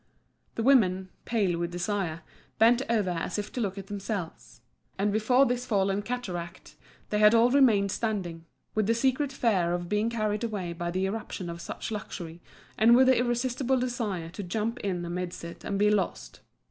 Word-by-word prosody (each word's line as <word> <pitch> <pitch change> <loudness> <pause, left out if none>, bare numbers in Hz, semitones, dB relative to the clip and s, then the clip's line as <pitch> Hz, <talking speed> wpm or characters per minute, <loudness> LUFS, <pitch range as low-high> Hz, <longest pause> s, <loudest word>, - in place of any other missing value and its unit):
The 225 - -2
women, 190 -8 +4 0.2
pale 195 -7 0
with 170 0 -1
desire, 175 -2 -2 0.4
bent 235 +3 +5
over 210 -6 +1
as 175 +2 -3
if 205 - -4
to 250 - -3
look 200 -2 -2
at 195 - -6
themselves. 195 -3 -6 0.4
And 200 +1 +1
before 250 +5 +4
this 245 -1 -1
falling 195 -2 +1
cataract 185 -7 -6 0.4
they 210 0 +2
all 230 +2 +4
remained 225 -8 +4
standing, 185 -8 -3 0.3
with 215 -2 +1
the 230 - +3
secret 265 +3 +1
fear 190 -10 +1
of 175 -1 -5
being 210 +2 +1
carried 215 -2 -1
away 200 -7 -3
by 175 +1 -4
the 185 +2 -1
irruption 195 -3 -4
of 170 0 -8
such - - -6
luxury, 175 -5 -6 0.4
and 230 +2 +7
with 260 +1 +6
the 260 - +5
irresistible 250 +2 0
desire 225 -9 -2
to 190 - -7
jump 220 +6 -2
in 180 -3 -2
amidst 175 0 -4
it 170 0 -9
and 200 - -2
be 210 +1 +4
lost. 200 -4 -2
205 Hz, 175 wpm, -28 LUFS, 180-235 Hz, 0.4 s, and